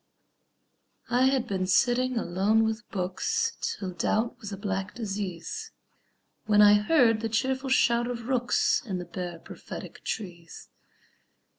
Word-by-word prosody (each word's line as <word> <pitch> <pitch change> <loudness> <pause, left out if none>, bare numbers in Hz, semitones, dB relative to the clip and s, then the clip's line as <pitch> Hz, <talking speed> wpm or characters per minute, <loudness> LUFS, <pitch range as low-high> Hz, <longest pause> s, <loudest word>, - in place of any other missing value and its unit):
I 250 +2 +4
had 265 -2 +1
been 190 -3 -1
sitting 245 +6 +2
alone 205 +3 +2
with 220 0 -3
books, 445 - -1
Till 195 - -3
doubt 215 +6 0
was 210 -4 -7
a 195 - -5
black 195 0 -3
disease, 200 - -4 0.8
When 210 -1 +4
I 205 0 +8
heard 225 +1 +4
the 225 - -2
cheerful 260 +4 -1
shout 240 -2 +3
of 235 -1 -5
rooks 250 -2 +2
In 195 -6 -4
the 180 - -5
bare, 175 0 -6
prophetic - - -10
trees. 175 -6 -6
215 Hz, 135 wpm, -27 LUFS, 190-245 Hz, 0.8 s, I